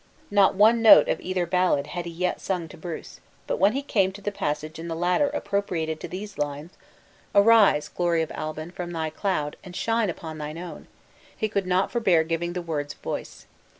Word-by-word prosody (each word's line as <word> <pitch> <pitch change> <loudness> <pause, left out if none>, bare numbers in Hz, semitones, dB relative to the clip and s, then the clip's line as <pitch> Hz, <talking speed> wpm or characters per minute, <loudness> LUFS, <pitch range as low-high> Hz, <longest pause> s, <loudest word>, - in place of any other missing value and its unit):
Not 200 -1 +4
one 220 +4 +5
note 225 - +8
of - - 0
either 185 -1 -1
ballad 180 -5 +1
had 175 +3 -5
he 170 - -5
yet 180 +2 -2
sung 180 -4 -2
to - - -11
Bruce; 170 0 -8 0.3
but - - -2
when 195 +3 +4
he 275 +2 -2
came 195 -8 +1
to 205 - -11
the 205 - -2
passage 155 -3 -3
in 165 - -6
the 165 - -3
latter 180 - +2
appropriated 165 -6 -2
to - - -6
these 200 +1 -7
lines 145 +3 -3 0.6
"Arise, 205 -7 +5
glory 170 -2 0
of 160 - -6
Albin, 155 +2 -5
from 180 -1 -6
thy 160 -2 -3
cloud, 155 -5 -2
And 180 -2 -10
shine 225 -1 +1
upon 160 -2 -6
thy 150 +1 -5
own!" 175 +1 -8 0.5
he 220 - 0
could 200 -3 -2
not 185 +1 +1
forbear 195 -9 +3
giving 165 +1 -2
the 180 -1 -4
words 145 -3 -3
voice. - - -6
175 Hz, 200 wpm, -25 LUFS, 160-200 Hz, 0.6 s, note